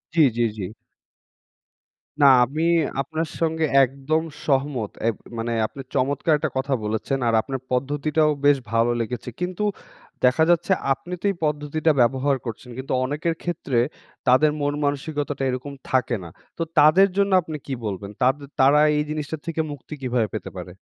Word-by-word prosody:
জি, 165 - +5 0.2
জি, 120 - +3
জি। 100 - -4 1.6
না 140 - +8 0.2
আমি 155 +6 -3 0.4
আপনার 160 +3 -3
সঙ্গে 160 -1 +1 0.2
একদম 140 +5 -1 0.2
সহমত। 135 -6 0 0.2
এব 115 - +1 0.2
মানে 115 +1 -2 0.2
আপনি 135 - -9
চমৎকার 140 +4 +1
একটা - - -2
কথা 135 +1 0
বলেছেন। 110 +6 -1
আর 115 - +2
আপনার 135 +1 -5
পদ্ধতিটাও 145 +4 +1
বেশ 145 -1 +6
ভালো 115 +1 +3
লেগেছে। 125 +1 -4
কিন্তু 180 +3 -2 0.6
দেখা 130 +6 +4
যাচ্ছে 175 +2 +2 0.2
আপনি 175 +6 -9
তো - - -6
এই - - -7
পদ্ধতিটা 150 +1 0
ব্যবহার 135 +3 +2
করছেন 115 +2 -7
কিন্তু 130 0 -4
অনেকের 155 +4 -1
ক্ষেত্রে 140 -8 -1 0.5
তাদের 150 +4 +5
মন 145 0 0
মানসিকতাটা 145 0 -2
এরকম 130 +3 -4 0.2
থাকে 130 -2 +1
না। 85 - -8 0.3
তো 165 - 0 0.2
তাদের 175 +7 +7
জন্য 200 0 +2
আপনি 155 -2 -6
কি 135 - -3
বলবেন? 100 0 -4
তাদে 135 +3 +2 0.2
তারা 140 +3 +6 0.2
এই 150 - +2
জিনিসটা 155 +1 -3
থেকে 165 -1 -1
মুক্তি 145 +2 -9
কিভাবে 125 -4 0
পেতে - - -5
পারে? 90 0 -7
140 Hz, 160 wpm, -23 LUFS, 125-155 Hz, 1.6 s, না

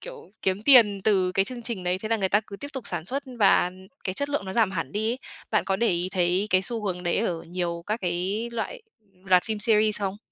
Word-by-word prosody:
kiểu, - - -11
kiếm 190 +2 0
tiền 220 -7 +7
từ 185 -4 +2
cái 195 - +2
chương 245 +2 -7
trình 225 -6 -4
đấy, 180 +1 0
thế 215 - -5
là 225 - +2
người 195 -3 0
ta 205 +2 +3
cứ 200 - -8
tiếp 285 - -7
tục 265 -3 -6
sản 175 -2 -4
xuất 275 +7 -2 0.2
và 195 -3 +5 0.3
cái 185 - -2
chất 285 +5 -2
lượng 285 -8 -2
nó 190 - -5
giảm 220 -2 +3
hẳn 165 -7 -4
đi 220 +2 0
ấy. 245 - -3 0.3
Bạn 215 - +2
có 195 - 0
để 235 +3 +2
ý 175 0 0
thấy 180 +2 +1
cái 185 0 +4
xu 225 0 -3
hướng 180 -2 -3
đấy 175 -1 0
ở 175 -6 -1
nhiều 170 -1 -4
các 215 +3 -2
cái 185 +6 -1
loại 445 - -4 0.4
loạt 185 -1 +4
phim 220 -1 -3
series. 215 -1 +3
không? 195 0 -2
200 Hz, 255 wpm, -25 LUFS, 185-225 Hz, 0.4 s, tiền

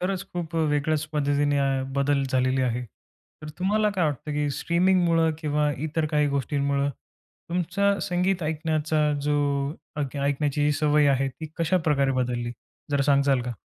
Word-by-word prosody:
खरंच 185 +1 -2
खूप 170 -2 -5
वेगळ्याच 155 -1 +1
पद्धतीने 145 -1 +1 0.4
बदल 140 0 +2
झालेली 130 0 +2
आहे, 125 0 -1
तर 150 +6 -17
तुम्हाला 210 +3 +2
काय 185 -4 0
वाटतं 150 0 -2
की 145 0 0
स्ट्रीमिंगमुळं 170 -2 +2
किंवा 150 -1 0 0.2
इतर 160 0 -1
काही 150 0 +3
गोष्टींमुळं 140 0 0
तुमचा 180 +8 -3
संगीत 180 0 0
ऐकण्याचा 155 -1 0
जो 145 0 +1 0.6
अक 145 -2 -3
ऐकण्याची 145 +1 0
जी 150 - +3
सवय 150 -1 +3
आहे 135 0 +2
ती 155 +4 -8
कशाप्रकारे 155 -5 +2
बदलली, 120 -2 -1 0.4
जरा 140 -1 +2
सांगाल 140 -1 +3
का? 125 - -4
150 Hz, 140 wpm, -25 LUFS, 140-165 Hz, 0.6 s, काही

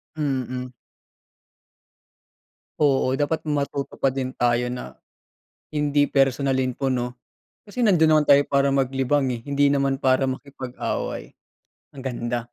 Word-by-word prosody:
Mm. 130 -4 -2 2.1
Oo, 140 -3 +3
dapat 145 +2 0
matuto 140 -1 -2
pa 135 - +1
din 130 -1 -2
tayo 120 0 +1
na 125 0 -6 0.8
hindi 145 -1 +1
personalin 135 -1 +1
po 135 -1 -1
'no. 125 -1 -2 0.5
Kasi 240 +4 -2
nandun 175 -7 +5
naman 155 - +4
tayo 140 -1 +6
para 140 0 +2
maglibang, 135 +1 +1
eh, 115 - -10
hindi 140 +1 +2
naman 140 -1 +1
para 130 0 +3
makipag-away. 130 -1 -4 0.6
Ang 135 - -9
ganda, 120 -2 -2
135 Hz, 120 wpm, -23 LUFS, 130-145 Hz, 2.1 s, tayo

